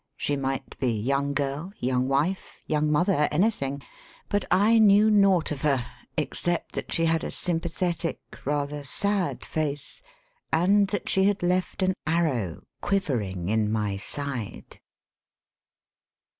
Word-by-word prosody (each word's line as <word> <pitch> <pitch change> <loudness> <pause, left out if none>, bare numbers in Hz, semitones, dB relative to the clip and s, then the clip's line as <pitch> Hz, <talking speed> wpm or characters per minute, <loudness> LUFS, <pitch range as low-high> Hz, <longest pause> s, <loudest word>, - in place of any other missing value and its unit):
She 145 - -1
might 135 -1 -3
be 130 - +1
young 140 +6 0
girl, 145 +7 -2
young 125 0 0
wife, 150 +8 -1
young 150 0 +1
mother, 150 -1 +3
anything 145 -6 0 0.2
— - - -26
^but 205 -1 +1
I 210 +5 +5
knew 210 0 +6
naught 195 -6 +4
of 140 -2 -4
her 135 -5 +1 0.3
except 175 -1 -1
that - - -5
she 165 - +2
had 165 0 +2
a - - -3
sym 175 -2 -1
pathetic, 170 0 -2 0.2
rather 145 +1 -2
sad 195 +6 -1
face, 145 - -3 0.5
and 195 +5 +4
that 205 -1 -3
she 190 0 +3
had 200 -2 +1
left 180 +2 0
an 185 0 +2
arrow 140 - 0 0.2
quivering 105 - -1
in 110 -1 +1
my 105 -2 0
side. 125 +2 -5
150 Hz, 140 wpm, -26 LUFS, 135-185 Hz, 0.5 s, knew